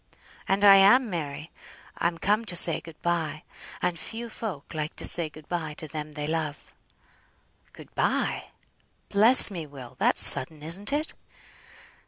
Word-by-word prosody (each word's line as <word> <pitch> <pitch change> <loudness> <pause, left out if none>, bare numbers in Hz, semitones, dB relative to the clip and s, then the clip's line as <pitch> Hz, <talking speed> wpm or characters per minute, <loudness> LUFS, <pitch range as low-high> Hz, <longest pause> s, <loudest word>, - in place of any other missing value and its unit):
"And 200 +1 0
I 195 -1 +7
am, 210 +5 +3
Mary! 155 -2 -7 0.5
I'm 170 0 -2
come 210 +6 -1
to 185 - -3
say 170 -1 +5
good 165 -2 -15
bye; 165 -3 -4 0.4
and 170 -2 -3
few 230 +8 -8
folk 180 -11 -9
like 155 -1 -6
to - - -3
say 170 -3 +1
good 155 0 -17
bye 160 -4 -6
to 155 - -9
them 150 -1 -9
they 150 0 -7
love." 155 -1 -6 1.0
"Good - - -17
bye! - - -2 0.6
Bless 220 +3 +7
me, 170 -5 -8
Will, 130 -3 -14
that's - - +4
sudden, 150 +3 +5
isn't 185 - -2
it?" 300 +2 -4
165 Hz, 155 wpm, -24 LUFS, 155-200 Hz, 1.0 s, I